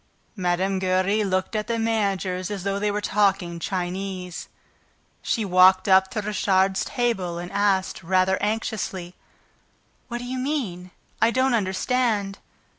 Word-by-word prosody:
Mme. 190 0 0
Giry 185 +3 +1
looked 185 +2 -1
at 215 0 -1
the 235 -1 -1
managers 195 -5 -1
as 200 -3 -4
though 200 0 -1
they 210 +1 0
were 205 0 -1
talking 195 -5 +1
Chinese. 185 0 -4 0.7
She 225 - -1
walked 185 0 +5
up 190 0 +5
to 215 - -3
Richard's 190 -2 +1
table 195 -8 -1
and 175 +1 -6
asked, 200 -2 +1
rather 185 +2 +1
anxiously: 205 -4 -3 0.9
"What 240 - -4
do 245 - -7
you 255 +1 -4
mean? 235 - -3 0.3
I 225 - +5
don't 260 +2 +2
understand." 205 0 0
195 Hz, 135 wpm, -24 LUFS, 185-215 Hz, 0.9 s, walked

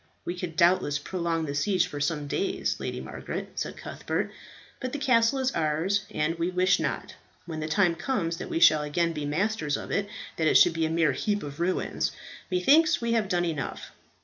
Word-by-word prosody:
"We 175 - -2
could 175 -3 -5
doubtless 170 -4 +3
prolong 165 +1 -2
the 140 - -4
siege 180 +5 +2
for 150 -5 -6
some 150 0 -1
days, 380 - -1
Lady - - -4
Margaret," - - -6
said - - -4
Cuthbert, - - -3 0.5
"but 255 -1 -4
the - - -1
castle 255 -2 +3
is 265 0 +1
ours; 165 - 0
and 165 +2 -1
we 170 +1 +1
wish 180 0 +3
not, - - -3 0.3
when 160 -2 -5
the 155 - -3
time 175 +2 +3
comes 170 -2 -2
that - - -6
we - - -1
shall 155 -2 +6
again 165 +3 0
be 150 -2 -4
masters 170 0 0
of - - -7
it, 200 0 0 0.3
that 160 - +2
it - - +6
should 175 - +6
be 165 -1 0
a - - -4
mere 165 0 +2
heap 205 -1 -1
of 145 0 -7
ruins. 180 +2 0 0.4
Methinks 305 - +4
we 235 0 -1
have 220 -4 +1
done 175 -1 +1
enough. 155 -5 -4
175 Hz, 200 wpm, -27 LUFS, 155-205 Hz, 0.5 s, shall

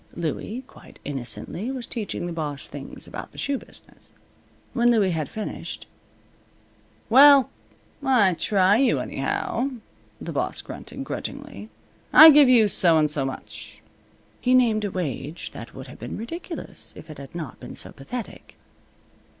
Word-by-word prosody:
Louie, 175 - -4
quite - - -16
innocently, 140 - -3
was 260 -3 -4
teaching 215 -7 -4
the 175 - -4
boss 150 -4 -4
things - - -6
about - - -8
the - - -17
shoe 280 -2 -1
business. - - -13 0.6
When 240 -1 +3
Louie 210 -6 +3
had 155 -4 -2
finished 215 - -6 1.2
"Well, 275 +3 +7 0.5
I 240 -9 +4
try 195 +3 +3
you, 265 +2 +3
anyhow," 270 - -2 0.5
the - - -6
boss - - -2
grunted, - - -8
grudgingly. - - -6 0.4
"I 315 0 +11
give 290 -3 +7
you 230 -4 +6
so 170 -4 +4
and 150 -1 +2
so 140 -3 -1
much." 135 - -8 0.6
He 255 0 +3
named 225 -4 +3
a - - -1
wage 165 -3 -4
that 115 - -10
would 130 - -8
have 130 - -12
been 120 - -6
ridiculous 330 - -6
if 155 - -11
it 150 - -10
had 140 +3 -11
not 155 -7 -6
been - - -9
so - - -6
pathetic. 225 - -8
200 Hz, 150 wpm, -24 LUFS, 155-250 Hz, 1.2 s, I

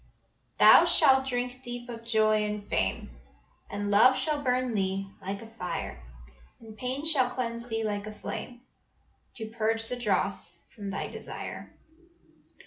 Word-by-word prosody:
"Thou - - +8
shalt 265 0 +5
drink 250 0 -3
deep 245 -1 -7
of 230 -1 -8
joy 215 -2 +2
and 210 -1 -4
fame, - - -1 0.6
And 205 0 -3
love 250 +6 +6
shall 300 -2 -1
burn 255 -2 0
thee 195 -1 -1
like 195 +3 -5
a 225 - -12
fire, 180 - -4 0.6
And 220 -1 -12
pain 255 +5 -4
shall 275 -6 +5
cleanse 235 -2 -4
thee 225 -1 -2
like 205 -1 -3
a - - -5
flame, 245 +3 -7 0.7
To 220 -2 -5
purge 225 0 -1
the 250 - -2
dross 240 -5 -1
from 205 -3 -6
thy 195 - -3
desire. - - -8
230 Hz, 145 wpm, -28 LUFS, 210-250 Hz, 0.7 s, Thou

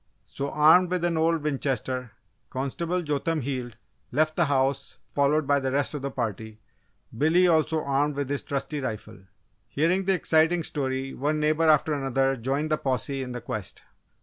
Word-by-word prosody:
So, 140 +1 -4
armed 160 +5 +5
with 180 -1 -1
an 175 -1 +1
old 160 -1 +1
Winchester, 130 -4 -2 0.4
Constable 165 +7 -2
Jotham 150 +1 -1
Heald 125 -3 -4 0.3
left 155 +3 +1
the 170 - +3
house 140 -1 0
followed 145 +2 +1
by 140 +1 +3
the 135 -1 -2
rest 140 +2 0
of 145 - -4
the 140 - -3
party 110 -3 -4 0.6
Billy 160 +8 +4
also 160 -1 +2
armed 140 +1 0
with 140 -1 -2
his 140 0 -2
trusty 145 +2 -3
rifle. 110 -4 -6 0.5
Hearing 180 +6 +1
the 195 0 +3
exciting 165 0 +2
story, 135 -2 -2
one 150 +3 -1
neighbour 155 +1 +2
after 155 0 +4
another 135 -1 +1
joined 135 +5 -2
the 155 - +3
posse 135 +1 -2
in 125 -1 -5
the 125 -1 -5
quest. 105 -4 -6
140 Hz, 170 wpm, -26 LUFS, 130-155 Hz, 0.6 s, armed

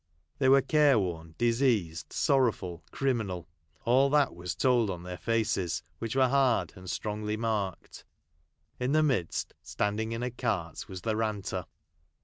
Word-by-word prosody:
They 130 -2 +4
were 135 0 +6
care 145 -2 +4
worn, 80 -5 -3
diseased, 115 - +1
sorrowful, 110 - +1
criminal; 110 - -1 0.4
all 130 +4 +4
that 145 -2 +3
was 90 +1 -5
told 125 -5 +3
on 90 -2 -4
their 90 0 -7
faces, 110 -8 0 0.2
which 115 +1 -3
were 130 -1 +5
hard, 130 -2 +2
and 90 0 -9
strongly 105 +2 -3
marked. 105 -5 -3 0.8
In 125 +3 0
the 155 0 +4
midst, 125 - -1
standing 105 +2 -2
in 115 +1 -3
a 125 - -2
cart, 100 -9 -3
was 95 -2 -7
the 110 +1 -1
ranter. 105 -5 -2
110 Hz, 145 wpm, -29 LUFS, 90-130 Hz, 0.8 s, were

